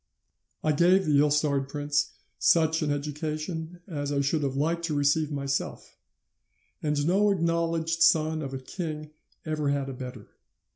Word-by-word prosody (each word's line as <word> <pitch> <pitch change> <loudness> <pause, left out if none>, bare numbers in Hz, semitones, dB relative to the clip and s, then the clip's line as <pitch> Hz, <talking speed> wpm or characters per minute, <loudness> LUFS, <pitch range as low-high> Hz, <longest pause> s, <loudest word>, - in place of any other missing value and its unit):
"'I 155 - +3
gave 180 +5 +4
the 145 -2 +4
ill 150 +1 +4
starred 145 -2 +1
prince 145 0 -1 0.3
such 160 - +3
an 155 - 0
education 155 +4 -4
as 145 -5 -3
I 140 - +1
should 145 +3 0
have 135 -2 -1
liked 165 +4 0
to 155 -3 -2
receive 145 +2 +2
myself, 140 -1 -3 0.9
and 150 -1 0
no 195 +5 +3
acknowledged 165 -2 0
son 160 -1 +4
of 135 -3 -5
a 135 - -3
king 155 +2 -6 0.3
ever 155 -2 -1
had 140 -1 -1
a - - -5
better. 125 -4 -8
150 Hz, 155 wpm, -27 LUFS, 145-165 Hz, 0.9 s, gave